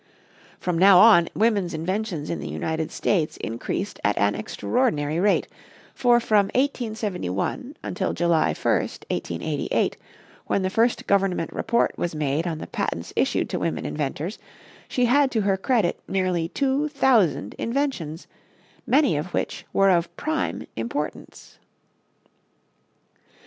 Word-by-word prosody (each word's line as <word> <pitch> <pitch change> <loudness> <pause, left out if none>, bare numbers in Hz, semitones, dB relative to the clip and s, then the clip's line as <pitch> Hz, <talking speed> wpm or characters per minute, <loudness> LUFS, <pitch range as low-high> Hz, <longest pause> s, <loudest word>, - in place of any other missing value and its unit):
From 175 -2 -1
now 190 0 +8
on 180 -4 +7
women's 205 -6 +1
inventions 180 -1 -3
in 170 - -3
the - - -6
United 160 -1 -3
States 165 -6 0
increased 120 - -4
at 105 - +1
an 100 0 +2
extraordinary 155 - -1
rate, 200 +2 +2 0.5
for 240 -1 +4
from 210 -4 +3
1871 225 - -2
until 185 +1 -2
July 170 -2 +2
1, - - +2
1888, - - -2 0.5
when 195 - +1
the 185 - -1
first 230 +3 +1
government 195 -4 +1
report 235 - +1
was 170 -2 -2
made 150 +2 -1
on 165 -2 -2
the - - -6
patents 85 0 -4
issued - - +1
to - - -1
women - - -2
inventors, 140 - -3 0.5
she 250 - +1
had 275 +3 +4
to 225 -4 0
her 195 -1 +2
credit 205 -2 +1
nearly 185 -3 0
two 275 +5 0
thousand 235 - +2
inventions, 230 - -2 0.6
many 275 - +4
of 155 +5 -3
which - - -3
were 195 0 +4
of 170 -1 0
prime 315 0 -2
importance. 120 +7 -5
190 Hz, 130 wpm, -24 LUFS, 160-235 Hz, 0.6 s, now